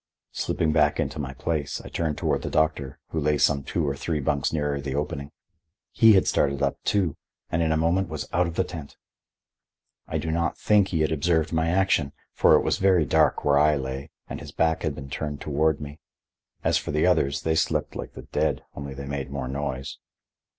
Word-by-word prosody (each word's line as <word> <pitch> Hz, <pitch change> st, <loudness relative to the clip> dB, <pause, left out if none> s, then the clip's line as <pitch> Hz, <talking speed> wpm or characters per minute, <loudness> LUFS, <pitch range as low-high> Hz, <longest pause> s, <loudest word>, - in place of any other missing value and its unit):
Slipping 80 Hz, -, 0 dB
back 75 Hz, -2 st, +3 dB
into -, -, -2 dB
my 65 Hz, -2 st, -4 dB
place, 75 Hz, -2 st, -2 dB
I -, -, -10 dB
turned 80 Hz, -3 st, -2 dB
toward -, -, 0 dB
the -, -, -4 dB
doctor, 75 Hz, -4 st, 0 dB
who 80 Hz, -, -2 dB
lay 75 Hz, 0 st, +2 dB
some 70 Hz, 0 st, +3 dB
two 75 Hz, +3 st, -2 dB
or 70 Hz, -, -1 dB
three 75 Hz, +2 st, -2 dB
bunks 70 Hz, 0 st, 0 dB
nearer 75 Hz, -2 st, -1 dB
the 70 Hz, -1 st, -4 dB
opening. 70 Hz, -1 st, -3 dB, 0.6 s
He 115 Hz, -2 st, +6 dB
had 95 Hz, -, +4 dB
started 70 Hz, 0 st, +1 dB
up, 70 Hz, -, -1 dB
too, 95 Hz, -7 st, +1 dB, 0.4 s
and 85 Hz, -, +1 dB
in 80 Hz, -1 st, +1 dB
a 80 Hz, -, +2 dB
moment 85 Hz, +4 st, +1 dB
was -, -, -5 dB
out 90 Hz, 0 st, +2 dB
of 85 Hz, -, -6 dB
the 95 Hz, -, +2 dB
tent. 80 Hz, -5 st, -9 dB, 1.1 s
I -, -, -2 dB
do 80 Hz, -, -2 dB
not 85 Hz, 0 st, 0 dB
think 105 Hz, -2 st, +3 dB
he 80 Hz, -5 st, -1 dB
had 80 Hz, -, +1 dB
observed 80 Hz, +1 st, +1 dB
my 80 Hz, 0 st, +1 dB
action, 90 Hz, -6 st, +2 dB, 0.2 s
for -, -, +5 dB
it -, -, +4 dB
was -, -, 0 dB
very 95 Hz, -4 st, +4 dB
dark -, -, +2 dB
where 70 Hz, -1 st, +4 dB
I 75 Hz, 0 st, +4 dB
lay 65 Hz, +2 st, -4 dB, 0.2 s
and -, -, -6 dB
his -, -, -9 dB
back 80 Hz, -1 st, +1 dB
had -, -, -2 dB
been 70 Hz, 0 st, -9 dB
turned 75 Hz, +1 st, -4 dB
toward 75 Hz, +1 st, +1 dB
me. 75 Hz, 0 st, -8 dB, 0.6 s
As -, -, +3 dB
for -, -, -8 dB
the 75 Hz, +3 st, +2 dB
others, 80 Hz, -6 st, +2 dB
they 80 Hz, -, +1 dB
slept 80 Hz, -, 0 dB
like -, -, -6 dB
the -, -, -9 dB
dead, -, -, -1 dB
only 70 Hz, -1 st, -7 dB
they 70 Hz, +1 st, -6 dB
made 70 Hz, -1 st, -4 dB
more 70 Hz, -2 st, -4 dB
noise. 65 Hz, -1 st, -4 dB
75 Hz, 215 wpm, -25 LUFS, 70-80 Hz, 1.1 s, He